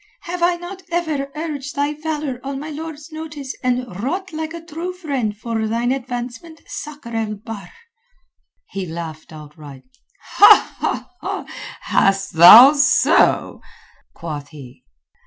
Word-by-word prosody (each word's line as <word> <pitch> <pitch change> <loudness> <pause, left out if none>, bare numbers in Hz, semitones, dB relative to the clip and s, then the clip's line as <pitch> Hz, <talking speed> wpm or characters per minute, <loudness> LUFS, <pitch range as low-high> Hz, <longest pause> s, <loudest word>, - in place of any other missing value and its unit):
Have 355 0 -6
I 345 +1 +3
not 350 +2 -9
ever 310 -5 -2
urged 295 -3 -5
thy 285 +1 0
valour 300 -4 -4
on 275 0 -4
my 305 +2 -7
lord's 310 0 -8
notice 300 -4 -7
and 250 0 0 0.2
wrought 360 - -3
like 315 0 -4
a 335 - -6
true 340 +3 -5
friend 275 - -3
for 225 0 -3
thine 235 +3 0
advancement, 255 +4 -5
Sakr 285 -6 -8
el 220 -2 -2
Bahr?" 210 0 -9 1.0
He 195 -2 -4
laughed 160 -1 -7
outright. 150 -3 -12 2.0
"Hast 195 -1 +1
thou 220 - +10
so?" 285 -1 +3 0.5
quoth 150 -4 -6
he. 135 -4 -13
270 Hz, 120 wpm, -20 LUFS, 210-315 Hz, 2.0 s, thou